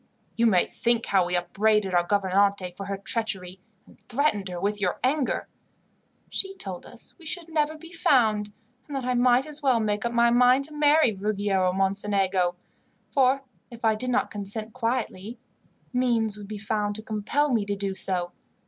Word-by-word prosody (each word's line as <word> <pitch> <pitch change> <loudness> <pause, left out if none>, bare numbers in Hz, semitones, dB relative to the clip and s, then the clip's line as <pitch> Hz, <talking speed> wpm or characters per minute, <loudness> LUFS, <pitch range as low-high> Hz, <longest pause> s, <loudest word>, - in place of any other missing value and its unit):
"You 235 0 +3
may 185 -5 +4
think 235 -1 0
how 190 -3 +2
we 180 - -1
upbraided 200 +2 +1
our 175 - +5
gouvernante 195 0 +1
for 195 +2 -8
her 200 0 -3
treachery, 195 -3 0 0.3
and - - -20
threatened 220 -7 0
her 175 -1 -5
with 205 +2 -1
your 180 -2 0
anger. 270 +1 0 0.8
She 390 0 -1
told 190 - -6
us 240 - -9
we 335 - -15
should 340 0 -3
never 310 -1 0
be 335 +3 -13
found, 220 -10 +2 0.4
and 290 - -6
that 265 -2 -3
I 250 - +1
might 245 +1 +3
as 300 0 -6
well 260 -4 +3
make 210 -1 -1
up 235 - -1
my 235 0 +3
mind 250 +2 +5
to 300 +2 -2
marry 295 -3 +4
Ruggiero 195 -2 0
Mocenigo, 195 -1 +1 0.6
for 270 0 +3 0.3
if 235 -1 -7
I 220 - +4
did 250 +4 -3
not 250 - 0
consent 210 +2 -5
quietly, 230 -3 -3 0.6
means 235 -4 +1
would 205 -1 -10
be 210 0 -6
found 210 0 -2
to 215 - -7
compel 225 +8 0
me 225 -3 +2
to 205 0 -2
do 195 -1 -2
so. 180 -2 -1
215 Hz, 180 wpm, -26 LUFS, 195-250 Hz, 0.8 s, our